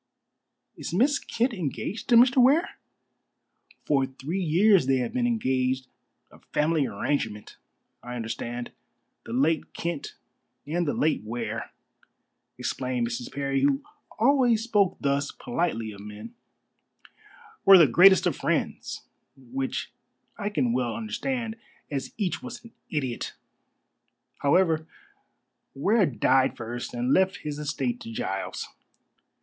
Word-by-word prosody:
"Is - - -5
Miss 280 +8 +3
Kent 240 +2 -1
engaged 185 - -4
to 240 - +6
Mr. 245 +2 +6
Ware?" 285 +8 +3 1.1
"For 135 -3 +2
three 145 +8 -4
years 180 -1 +4
they 135 - +4
have 125 -2 -2
been 245 -1 +1
engaged 130 - 0 0.5
a - - -17
family 150 -2 0
arrangement, 105 -1 -3 0.4
I 125 0 -7
understand. 120 +1 -4 0.6
The - - -7
late 145 +5 +1
Kent 170 -4 -4 0.5
and 170 +3 -1
the - - 0
late 155 +1 +1
Ware," 115 0 -4 0.9
explained 125 -2 -2
Mrs. 120 +1 -5
Parry, 140 -1 -1
who 140 0 +2 0.3
always 245 -2 +3
spoke 205 -5 +2
thus 140 0 0
politely 115 -11 -2
of 100 - -11
men, 105 +2 -9 1.3
"were 195 -1 +9
the 170 - +8
greatest 180 +9 +6
of - - +1
friends, - - -2 0.3
which 130 +1 -4 0.4
I 205 - -3
can 125 - 0
well 125 -1 0
understand, 230 0 -3 0.3
as 135 -2 -3
each 200 -1 -1
was 245 -2 -8
an 230 - -13 0.2
idiot. 130 -6 -3 1.0
However, 160 +1 +2 0.9
Ware 195 +7 +3
died 130 +2 +2
first 120 +1 -5
and 125 +3 +1
left 190 +3 +2
his 150 -1 -4
estate 240 +11 -2
to 230 -1 -8
Giles. 245 +2 -3
150 Hz, 125 wpm, -26 LUFS, 130-210 Hz, 1.3 s, were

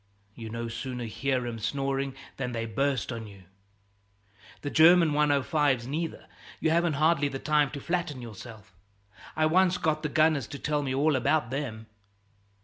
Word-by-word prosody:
You 110 0 -8
no 115 +1 -4
sooner 125 +1 -5
hear 125 +2 -1
em 115 -1 -5
snoring 135 +3 -2 0.2
than 125 -2 -3
they 115 -1 -2
burst 130 +1 -1
on 115 -2 -6
you. 100 -2 -14 1.2
"The 145 - -4
German 165 0 +6
105's, 145 -3 +2
neither, 160 +5 -4 0.3
you 160 - +1
haven't 170 0 +2
hardly 155 0 +2
the 135 - -4
time 150 0 +2
to 140 - -7
flatten 170 -3 -2
yourself. 110 -3 -11 0.6
I 155 - +2
once 180 +3 +3
got 155 -3 0
the 150 - -2
gunners 155 -4 +2
to 140 - -7
tell 150 +1 -1
me 135 -2 -3
all 145 +2 +2
about 130 +1 +1
them." 125 -6 -4
140 Hz, 160 wpm, -28 LUFS, 120-155 Hz, 1.2 s, German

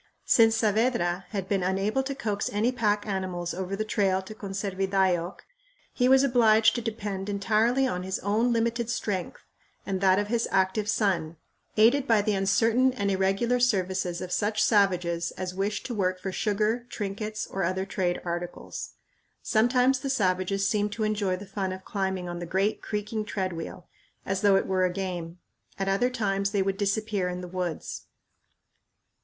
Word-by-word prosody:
Since 225 -1 +5
Saavedra 215 -5 +1
had 195 -3 -4
been 195 -1 0
unable 195 +7 0
to 275 +1 -4
coax 210 -7 -2
any 215 +4 +1
pack 210 -4 0
animals 185 -4 -3
over 190 +2 -3
the 215 +2 -2
trail 195 -3 +1
to 200 - -9
Conservidayoc 195 -3 -1 0.5
he 250 0 +2
was 265 +1 +6
obliged 225 -4 +5
to 240 - -2
depend 205 -3 -4
entirely 220 +6 +2
on 180 -8 -2
his 190 +1 -3
own 220 +5 +1
limited 235 0 0
strength 195 -6 -3 0.4
and 190 -1 -2
that 190 -1 +5
of 205 - +1
his 230 +1 0
active 190 +2 +1
son, 170 -7 0 0.4
aided 245 +6 +4
by 220 -3 +4
the 210 0 +1
uncertain 225 +6 +3
and 200 -5 -1
irregular 195 +6 +1
services 190 -6 0
of 180 - -6
such 215 +2 +1
savages 180 -5 +2
as 185 0 -4
wished 200 +2 -2
to 245 - -4
work 185 -3 0
for 190 +1 -4
sugar, 215 +4 0
trinkets, 210 +1 -4
or 195 - -4
other 185 +2 -1
trade 180 -3 -1
articles. 175 0 -5 0.5
Sometimes 250 +4 +3
the 275 +1 -4
savages 195 -4 +1
seemed 210 0 0
to 220 +1 -2
enjoy 210 -3 0
the 195 +3 -8
fun 195 -1 -3
of 185 0 -7
climbing 190 -3 -2
on 175 0 -5
the 175 - -5
great 195 +5 0
creaking 210 +1 -3
treadwheel, 185 -4 -4 0.4
as 190 0 -1
though 200 -2 +5
it 195 - +2
were 185 -1 +1
a 180 - +2
game. 180 -2 -4 0.4
At 195 - -2
other 200 +6 +2
times 200 -5 0
they 200 -1 +1
would 195 0 -1
disappear 200 -1 0
in 180 0 -4
the 180 - -7
woods. 180 -2 -4
200 Hz, 170 wpm, -27 LUFS, 185-220 Hz, 0.5 s, was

